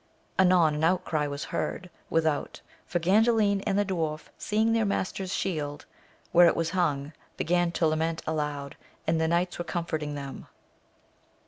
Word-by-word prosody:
Anon 180 -4 +5
an 150 +1 -2
outcry 165 -3 +1
was 140 0 -4
heard 180 -1 -3 0.2
without, 160 -2 0 0.3
for 175 - 0
Ganddin 205 +3 +3
and 195 - +1
the 205 - +2
dwarf 160 -5 -3
seeing 220 +1 +1
their 230 -1 +2
master's 190 -2 -2
shield 150 -8 -2 0.5
where' 175 0 +7
it - - +3
was 165 -1 -1
hung, 150 -5 0 0.2
began 175 0 +1
to 170 - +1
lament 160 +1 0
aloud, 150 -3 -3 0.3
and 160 0 +1
the 160 - +2
knights 175 +2 0
were - - -1
comforting 160 -4 -3
them. 140 -1 -7
165 Hz, 150 wpm, -28 LUFS, 155-185 Hz, 0.5 s, where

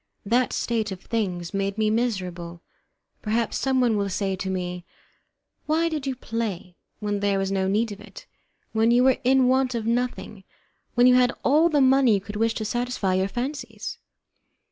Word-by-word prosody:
That 240 +4 +2
state 225 -3 -1
of 190 - -6
things 185 -5 -3
made 195 +1 -2
me 215 -1 +2
miserable. 180 -7 -3 0.6
Perhaps 225 +1 -1
someone 255 -4 +2
will 200 -1 -1
say 195 0 -1
to 190 0 -4
me: 180 -1 -3 0.8
"Why 325 +2 +2
did 300 -4 -4
you 265 - -1
play, 220 -7 -4 0.2
when 205 -1 -2
there 200 -1 +1
was 195 0 -1
no 190 -1 0
need 215 +3 +1
of 205 0 -9
it, 205 -2 -12 0.5
when 220 +1 +2
you 240 +1 +4
were 260 -1 +4
in 260 0 +4
want 260 -1 +2
of 225 -2 -3
nothing, 235 -4 -2 0.5
when 245 0 +5
you 250 - +7
had 250 -1 +4
all 310 +5 +4
the 295 -3 +2
money 265 -3 +5
you - - +1
could 205 +2 -9
wish 225 +1 +1
to 215 - -3
satisfy 240 -4 -1
your 190 +1 +1
fancies?" 255 +8 -5
220 Hz, 180 wpm, -24 LUFS, 195-250 Hz, 0.8 s, you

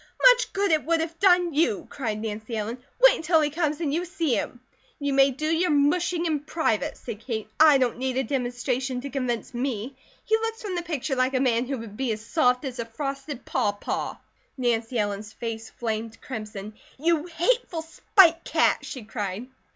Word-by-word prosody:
"Much - - 0
good 400 -1 +1
it 310 -1 +3
would 335 +1 +1
have 325 0 -4
done 355 -3 +4
you!" 335 +4 +1
cried 220 -6 -3
Nancy 220 +1 -4
Ellen. 220 +4 -3 0.2
"Wait - - +8
until 320 0 +3
he 300 -1 +1
comes, 305 -1 -1
and 300 -4 -1
you 340 +3 0
see 335 -6 -1
him!" 235 +3 -2 0.4
"You 285 -1 -1
may 270 0 +6
do 275 +4 -4
your 330 +3 +2
mushing 335 +4 +2
in 310 -3 +1
private," 290 -7 -1
said 230 -4 -7
Kate. 225 -3 -4
"I 305 -2 +8
don't 250 -2 0
need 260 0 -1
a 265 - +2
demonstration 250 0 -2
to 280 +1 -6
convince 250 -4 -2
me. 245 0 -3 0.3
He 440 - +3
looks 450 +1 -4
from 405 -3 -3
the 350 - -1
picture 310 -5 -2
like 255 +1 +1
a - - +3
man 245 -2 +2
who 275 0 -2
would 220 -3 -9
be 260 -3 0
as 215 0 -5
soft 250 -2 +2
as 255 -2 -5
a 235 - -2
frosted 275 +2 -5
pawpaw." 205 0 -1 0.4
Nancy 240 -1 0
Ellen's 205 0 -2
face 225 -1 -5
flamed 225 -1 -4
crimson. 215 -4 -7 0.2
"You 330 +2 +1
hateful 350 0 0
spite 335 +1 +4
cat!" - - +2
she 255 -5 -7
cried. 210 +1 -5
270 Hz, 190 wpm, -26 LUFS, 230-325 Hz, 0.4 s, Wait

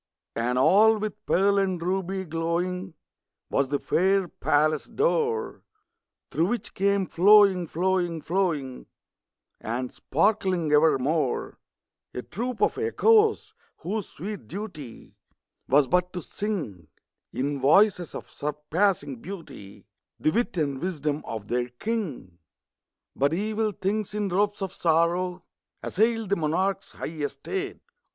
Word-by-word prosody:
And 120 +2 0
all 215 +11 +5
with 215 -1 -5
pearl 200 +2 +3
and 190 -2 0
ruby 190 +2 -2
glowing 170 +2 -2 0.6
Was 140 - +2
the 145 +2 0
fair 190 +5 +1
palace 155 -1 +1
door, 455 0 0 0.7
Through 165 - +1
which 240 +4 -3
came 200 0 +1
flowing, 195 -1 +5
flowing, 175 -1 0
flowing, 155 -8 -1 0.7
And 125 +3 -4
sparkling 185 -1 +1
evermore, 150 -2 +2 0.6
A 125 - -4
troop 240 +4 -3
of - - +1
Echoes, 445 -1 +3 0.2
whose 205 +2 -4
sweet 195 - -7
duty 165 - -8 0.5
Was 140 +1 +4
but 180 +6 +1
to 180 -3 -5
sing, 155 - -4 0.4
In 140 +2 -2
voices 175 +5 +3
of - - -7
surpassing 150 0 -1
beauty, 150 - -10 0.3
The 155 - +2
wit 235 0 -1
and 140 -4 -1
wisdom 155 -4 -2
of 110 -3 -6
their 125 +1 -1
king. 130 - -4 0.8
But 140 +4 +1
evil 215 +2 -1
things, 205 +2 -2
in 205 -2 -1
robes 205 +2 0
of 190 -1 -4
sorrow, 175 +1 +1 0.4
Assailed 225 0 +1
the 200 - +3
monarch's 175 +5 -1
high - - -6
estate. 155 - -4
180 Hz, 120 wpm, -26 LUFS, 150-200 Hz, 0.8 s, all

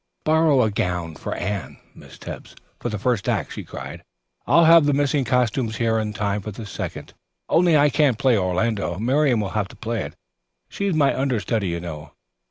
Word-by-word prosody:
"Borrow 155 -4 +4
a 110 - +1
gown 90 -4 -2
for - - -5
Anne, 100 0 -4 0.2
Miss - - -14
Tebbs, - - -9 0.2
for 120 - -3
the 105 - -3
first 110 -1 0
act," - - -1
she - - -6
cried. - - -8 0.5
"I'll 170 0 +5
have 165 -2 +7
the 145 - +3
missing 145 0 +1
costumes 120 -1 0
here 110 -1 +1
in 105 -1 -2
time 105 -1 -2
for 105 - -6
the 105 +2 -8
second. 100 - -6 0.3
Only 170 -2 +4
I 145 0 +4
can't 140 -5 +2
play 130 -1 +3
Orlando. 95 -1 0
Miriam 130 +3 +2
will 100 - -3
have 105 -3 -1
to - - -15
play 115 -2 -3
it; - - -7 0.5
she's 200 -3 -2
my 145 -3 +3
understudy, 115 -5 -1
you 85 -1 -2
know. 80 -3 -8
115 Hz, 190 wpm, -22 LUFS, 100-140 Hz, 0.5 s, have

